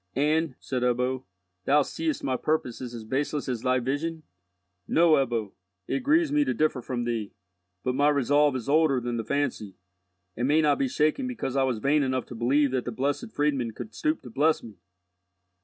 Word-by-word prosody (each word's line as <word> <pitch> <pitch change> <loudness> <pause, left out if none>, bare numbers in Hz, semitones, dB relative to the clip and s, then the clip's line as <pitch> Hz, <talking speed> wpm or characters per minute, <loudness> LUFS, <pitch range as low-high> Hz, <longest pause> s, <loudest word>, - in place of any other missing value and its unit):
"And," 150 +1 +1
said 130 -2 -3
Ebbo, 125 +1 0 0.4
"thou 145 +1 +4
seest 160 +1 -3
thy 130 - 0
purpose 130 -4 -1
is 120 -2 -6
as 115 - -7
baseless 140 +4 -2
as 125 -3 -2
thy 130 0 +2
vision?" 150 +6 -2 0.6
"No, 170 0 +4
Ebbo. 120 -8 +1 0.4
It - - 0
grieves 295 +3 +2
me 295 0 +3
to - - -1
differ 155 -4 +1
from 120 0 -3
thee, 115 -4 -3 0.5
but 125 - 0
my 145 +3 +3
resolve 145 0 +3
is 125 -2 -4
older 150 -2 +3
than 120 -1 -3
the 115 - -2
fancy, 115 -7 -2 0.6
and 120 +2 -1
may 150 +2 +4
not 150 -2 +3
be 135 - +2
shaken 155 - +1
because 230 - -4
I 135 - +3
was 130 -3 +1
vain 140 +7 +2
enough 130 -2 -1
to - - -7
believe 135 +4 +2
that 130 -2 -1
the 125 - -3
Blessed 140 - -2
Friedmund 135 - 0
could 110 -2 -8
stoop 150 +8 -1
to 125 - -10
bless 155 +6 +2
me." 110 -3 -12
135 Hz, 195 wpm, -27 LUFS, 125-150 Hz, 0.6 s, thou